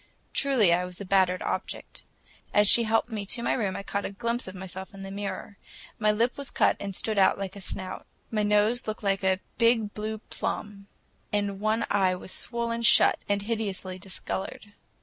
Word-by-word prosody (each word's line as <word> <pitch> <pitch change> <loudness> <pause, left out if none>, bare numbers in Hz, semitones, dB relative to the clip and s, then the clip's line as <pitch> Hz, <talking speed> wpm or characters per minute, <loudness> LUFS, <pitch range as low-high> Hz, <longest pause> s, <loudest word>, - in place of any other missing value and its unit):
Truly, 250 -11 +4
I 180 +1 +2
was 180 0 -8
a 200 - -6
battered 185 -1 +2
object. - - -4 0.5
As 205 0 +6
she 235 +3 +7
helped 225 +2 +1
me 215 -2 -3
to 235 +3 +1
my - - +2
room, 200 -6 -1
I - - -5
caught 200 0 -2
a - - -3
glimpse 235 +4 -2
of 185 - -7
myself 190 +1 -7
in 195 - -8
the 195 - -7
mirror. 200 0 -5 0.4
My 215 -1 +4
lip 235 +5 0
was 280 - -4
cut - - +3
and 200 -1 -5
stood 215 0 0
out 190 - +5
like 195 -1 -5
a 200 - -9
snout. 185 0 -5 0.2
My 215 -2 +1
nose 210 +3 +2
looked 215 0 -4
like 195 -1 +1
a 190 0 +2 0.2
big 230 -3 +3
blue 215 +1 -3
plum, 205 -2 -5 0.4
and 205 -1 -1
one 215 +2 +1
eye 190 -2 +3
was 180 - -6
swollen 235 -1 -1
shut 230 - +6
and 200 0 +1
hideously 200 -4 -3
discolored. 195 +2 -5
205 Hz, 195 wpm, -27 LUFS, 195-220 Hz, 0.5 s, she